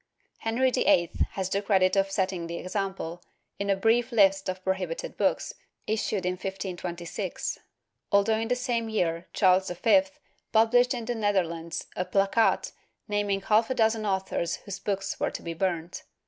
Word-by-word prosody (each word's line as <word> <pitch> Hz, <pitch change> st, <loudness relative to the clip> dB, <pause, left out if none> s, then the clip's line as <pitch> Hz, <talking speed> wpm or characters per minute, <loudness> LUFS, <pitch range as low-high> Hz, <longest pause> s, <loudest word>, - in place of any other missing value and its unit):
Henry 250 Hz, +4 st, +1 dB
VIII 175 Hz, -7 st, +3 dB, 0.2 s
has 190 Hz, -2 st, -2 dB
the 200 Hz, -, +1 dB
credit 190 Hz, -2 st, +3 dB
of 195 Hz, 0 st, +2 dB
setting 185 Hz, -3 st, -1 dB
the 170 Hz, 0 st, -5 dB
example, 185 Hz, -3 st, -4 dB, 0.4 s
in 200 Hz, 0 st, -2 dB
a 195 Hz, -, +4 dB
brief 230 Hz, +5 st, +2 dB
list 195 Hz, -4 st, +4 dB
of 185 Hz, 0 st, -4 dB
prohibited 185 Hz, -3 st, -2 dB
books, -, -, 0 dB, 0.3 s
issued 210 Hz, -3 st, -1 dB
in 180 Hz, -, +2 dB
1526, 180 Hz, -1 st, -4 dB, 0.5 s
although 200 Hz, +2 st, +3 dB
in 225 Hz, -, -2 dB
the 250 Hz, -, +1 dB
same 240 Hz, -2 st, -1 dB
year 170 Hz, -5 st, -1 dB
Charles 185 Hz, -1 st, +3 dB
V 225 Hz, +10 st, +4 dB, 0.5 s
pub 225 Hz, 0 st, +4 dB
lished 245 Hz, +1 st, +4 dB
in 235 Hz, -2 st, -5 dB
the 245 Hz, -, -1 dB
Netherlands 175 Hz, -7 st, -1 dB
a 180 Hz, -, 0 dB
plakaat 195 Hz, +4 st, +2 dB, 0.4 s
naming 205 Hz, -2 st, 0 dB
half 215 Hz, +4 st, +3 dB
a 260 Hz, -, 0 dB
dozen 225 Hz, -2 st, +2 dB
authors 190 Hz, -3 st, -1 dB
whose 200 Hz, -2 st, -6 dB
books 195 Hz, -1 st, -3 dB
were -, -, +1 dB
to -, -, -7 dB
be 170 Hz, -, -4 dB
burnt. 175 Hz, 0 st, -2 dB
195 Hz, 160 wpm, -27 LUFS, 185-220 Hz, 0.5 s, a